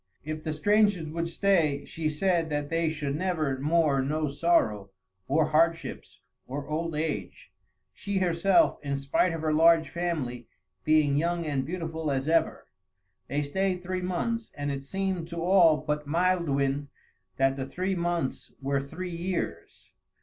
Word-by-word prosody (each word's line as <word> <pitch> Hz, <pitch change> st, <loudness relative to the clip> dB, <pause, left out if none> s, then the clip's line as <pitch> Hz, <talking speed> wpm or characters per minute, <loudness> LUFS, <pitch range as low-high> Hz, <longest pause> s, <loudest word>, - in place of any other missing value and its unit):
If 155 Hz, +1 st, -5 dB
the 155 Hz, -, -2 dB
strangers 205 Hz, 0 st, +2 dB
would 170 Hz, +1 st, -3 dB
stay, 165 Hz, -6 st, +1 dB
she 160 Hz, -1 st, -3 dB
said 165 Hz, +1 st, +1 dB
that 145 Hz, 0 st, -3 dB
they 165 Hz, -1 st, +1 dB
should 145 Hz, -3 st, -3 dB
never 155 Hz, -6 st, -1 dB
more 150 Hz, -1 st, +2 dB
know 150 Hz, +3 st, -1 dB
sorrow, 140 Hz, -, +1 dB, 0.4 s
or 155 Hz, +3 st, +2 dB
hardships, 165 Hz, +2 st, 0 dB, 0.3 s
or 140 Hz, +2 st, -5 dB
old 160 Hz, +1 st, -2 dB
age; 155 Hz, 0 st, -4 dB, 0.4 s
she 200 Hz, -1 st, -3 dB
herself, 190 Hz, -, +3 dB
in 140 Hz, -1 st, -2 dB
spite 140 Hz, +6 st, +1 dB
of 165 Hz, -1 st, -4 dB
her 155 Hz, -1 st, 0 dB
large 165 Hz, -1 st, +5 dB
family, 145 Hz, -9 st, -3 dB, 0.4 s
being 155 Hz, -2 st, +3 dB
young 170 Hz, +2 st, 0 dB
and 140 Hz, -3 st, -1 dB
beautiful 160 Hz, -2 st, -3 dB
as 135 Hz, 0 st, -1 dB
ever. 165 Hz, +1 st, +1 dB, 0.6 s
They 145 Hz, +2 st, -1 dB
stayed 185 Hz, +4 st, -1 dB
three 185 Hz, +1 st, -3 dB
months, 220 Hz, +6 st, -2 dB
and 145 Hz, 0 st, -2 dB
it 135 Hz, -1 st, -4 dB
seemed 190 Hz, +1 st, -2 dB
to 170 Hz, -1 st, -5 dB
all 175 Hz, -4 st, +5 dB
but 150 Hz, -1 st, -3 dB
Maelduin 145 Hz, -5 st, +1 dB, 0.5 s
that 135 Hz, 0 st, +2 dB
the 135 Hz, -1 st, -4 dB
three 185 Hz, +7 st, -2 dB
months 170 Hz, -5 st, -2 dB
were 140 Hz, 0 st, 0 dB
three 170 Hz, +5 st, -6 dB
years. 180 Hz, +2 st, -4 dB
160 Hz, 150 wpm, -28 LUFS, 145-175 Hz, 0.6 s, large